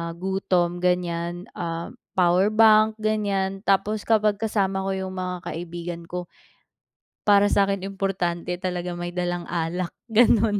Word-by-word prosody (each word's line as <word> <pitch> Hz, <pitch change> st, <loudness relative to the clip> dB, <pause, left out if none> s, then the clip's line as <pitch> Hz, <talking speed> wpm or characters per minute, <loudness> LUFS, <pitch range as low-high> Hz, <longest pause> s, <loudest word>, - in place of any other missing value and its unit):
gutom 180 Hz, -1 st, 0 dB
ganyan, 175 Hz, 0 st, -1 dB
ah, 170 Hz, -1 st, -4 dB, 0.2 s
powerbank 215 Hz, +4 st, +5 dB
ganyan, 200 Hz, -3 st, -1 dB
tapos, 200 Hz, +2 st, +1 dB
kapag 215 Hz, -2 st, +3 dB
kasama 195 Hz, -3 st, 0 dB
ko -, -, 0 dB
yung 190 Hz, 0 st, -4 dB
mga 180 Hz, -1 st, -4 dB
kaibigan 170 Hz, 0 st, -6 dB
ko, 180 Hz, -1 st, -6 dB, 0.9 s
para 205 Hz, -1 st, +5 dB
sakin 195 Hz, -1 st, +1 dB
importante 185 Hz, -3 st, -2 dB
talaga 180 Hz, -1 st, -3 dB
may 175 Hz, 0 st, -5 dB
dalang 175 Hz, -1 st, -2 dB
alak 170 Hz, +1 st, -2 dB, 0.2 s
ganun 220 Hz, -2 st, +4 dB
185 Hz, 120 wpm, -24 LUFS, 175-205 Hz, 0.9 s, powerbank